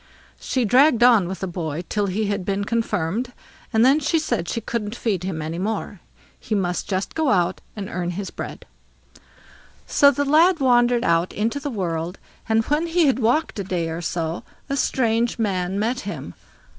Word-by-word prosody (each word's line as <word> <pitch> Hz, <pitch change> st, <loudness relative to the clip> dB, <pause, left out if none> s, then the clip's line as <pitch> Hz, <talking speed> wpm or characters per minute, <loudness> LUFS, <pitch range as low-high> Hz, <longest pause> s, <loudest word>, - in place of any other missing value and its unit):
She 255 Hz, -3 st, -1 dB
dragged 245 Hz, +2 st, +5 dB
on 230 Hz, -7 st, +6 dB
with 190 Hz, +1 st, -6 dB
the 190 Hz, -, -2 dB
boy 170 Hz, -2 st, -4 dB
till 205 Hz, -1 st, 0 dB
he 205 Hz, +3 st, -1 dB
had 200 Hz, -2 st, -2 dB
been 200 Hz, +2 st, -1 dB
confirmed, 230 Hz, +1 st, -1 dB, 0.4 s
and 225 Hz, 0 st, +4 dB
then 275 Hz, +4 st, +5 dB
she 305 Hz, +3 st, +1 dB
said 240 Hz, -, -1 dB
she -, -, -1 dB
couldn't 225 Hz, -1 st, -4 dB
feed 205 Hz, -7 st, -1 dB
him 170 Hz, -4 st, -3 dB
any 165 Hz, +2 st, -4 dB
longer, 205 Hz, -1 st, -3 dB, 0.4 s
he 215 Hz, -, -3 dB
must 180 Hz, -3 st, -1 dB
just 190 Hz, 0 st, -2 dB
go 315 Hz, -3 st, +1 dB
out 180 Hz, -3 st, +1 dB
and 200 Hz, -3 st, -5 dB
earn 175 Hz, -1 st, -3 dB
his 190 Hz, +1 st, -5 dB
own -, -, -31 dB
bread. -, -, -7 dB, 1.2 s
So 280 Hz, -, +5 dB
the 285 Hz, +1 st, 0 dB
lad 325 Hz, +5 st, +4 dB
wandered 245 Hz, -2 st, +3 dB
out 170 Hz, +1 st, +1 dB
into 225 Hz, +6 st, -1 dB
the 285 Hz, -, -4 dB
world, 175 Hz, -5 st, -3 dB, 0.3 s
and 220 Hz, 0 st, +2 dB
when 305 Hz, +3 st, 0 dB
he 335 Hz, 0 st, +3 dB
had 265 Hz, -2 st, +2 dB
walked 245 Hz, +2 st, +1 dB
a -, -, -1 dB
day 175 Hz, -3 st, -2 dB
or 165 Hz, +1 st, -4 dB
so, 165 Hz, -1 st, -3 dB, 0.3 s
a 275 Hz, -, 0 dB
strange 235 Hz, -4 st, +1 dB
man 190 Hz, -4 st, -1 dB
met 235 Hz, +4 st, 0 dB
him. 160 Hz, -, -6 dB
210 Hz, 190 wpm, -22 LUFS, 180-250 Hz, 1.2 s, on